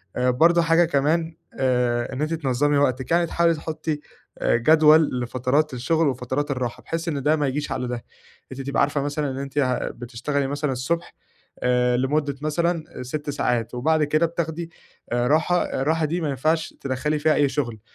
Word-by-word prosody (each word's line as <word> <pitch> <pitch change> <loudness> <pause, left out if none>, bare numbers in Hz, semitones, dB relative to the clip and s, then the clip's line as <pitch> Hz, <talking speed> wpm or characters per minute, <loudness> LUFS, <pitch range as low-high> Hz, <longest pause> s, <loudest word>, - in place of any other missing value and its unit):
آآ 125 0 +2
برضه 170 +7 +4
حاجة 165 +1 +4
كمان 160 +2 0 0.2
آآ 125 -2 +1
إن 130 - -4
أنتِ 155 +2 -1
تنظّمي 145 -1 +1
وقتِك، 130 0 0
يعني 170 0 +4
تحاولي 170 0 +2
تحطّي 155 -1 -4 0.4
جدول 155 +1 +4
لفترات 130 +4 0
الشغل 155 +6 +1
وفترات 130 +3 -2
الراحة، 125 -3 -3
بحيث 165 +1 -4
إن 140 -4 -2
ده 155 +1 +3
ما 145 -2 0
يجيش 140 +1 -3
على 125 -2 -2
ده، 120 -1 -4 0.5
أنتِ 130 +1 -6
تبقى 140 +1 0
عارفة 140 0 +1
مثلًا 145 0 -2
إن 130 - -6
أنتِ 140 +1 -6
ه 130 -2 0
بتشتغلي 130 +4 -3
مثلًا 145 0 -2
الصبح، 165 +7 -2 0.5
آآ 125 0 +2
لمدة 140 +2 0
مثلًا 160 -2 -2
6 145 +4 -5
ساعات، 120 -5 -1
وبعد 155 +5 +2
كده 155 +3 +2
بتاخدي 165 0 -4 0.4
آآ 120 0 +1
راحة 160 +5 +2 0.2
الراحة 160 +3 +1
دي 170 +3 -2
ما 155 - -1
ينفعش 155 +4 0
تدخّلي 140 +3 -1
فيها 155 +1 +3
أي 145 -2 +3
شغل، 120 -7 -3
145 Hz, 175 wpm, -23 LUFS, 130-160 Hz, 0.5 s, برضه